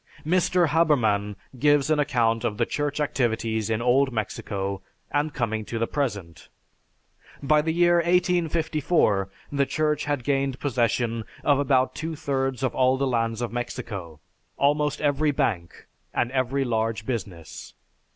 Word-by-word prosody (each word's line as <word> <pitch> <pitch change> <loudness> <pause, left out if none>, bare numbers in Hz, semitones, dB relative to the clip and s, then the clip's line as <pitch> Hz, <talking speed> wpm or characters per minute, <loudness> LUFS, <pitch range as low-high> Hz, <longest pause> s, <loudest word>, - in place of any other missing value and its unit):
Mr. 180 0 +2
Haberman 115 -11 +2 0.2
gives 145 +1 +3
an 155 - +3
account 120 -5 +1
of 110 -3 -1
the - - +2
church 145 0 -2
activities 115 -6 -1
in 110 +1 -1
old 130 +2 +3
Mexico 100 -3 -3 0.3
and 145 +1 0
coming 110 -5 -2
to 115 - -5
the 115 - +1
present, 100 - -4 0.9
"By 150 +2 +4
the 160 +1 -1
year 175 +1 +4
1854, 165 - +1 0.2
the 140 -1 +1
Church 155 -1 0
had 145 -3 -1
gained 135 -1 0
possession 120 -3 0 0.2
of 145 -2 +3
about 130 -2 +2
two 160 +1 -4
thirds 135 -3 -2
of 130 - 0
all 130 0 +3
the 140 - 0
lands 115 -2 -1
of 120 - -3
Mexico, 105 - -5 0.4
almost 145 +1 +1
every 150 +1 +2
bank, 115 - -2 0.3
and 120 - 0
every 135 +1 0
large 110 -2 -1
business. 95 -10 -6
130 Hz, 140 wpm, -25 LUFS, 115-150 Hz, 0.9 s, By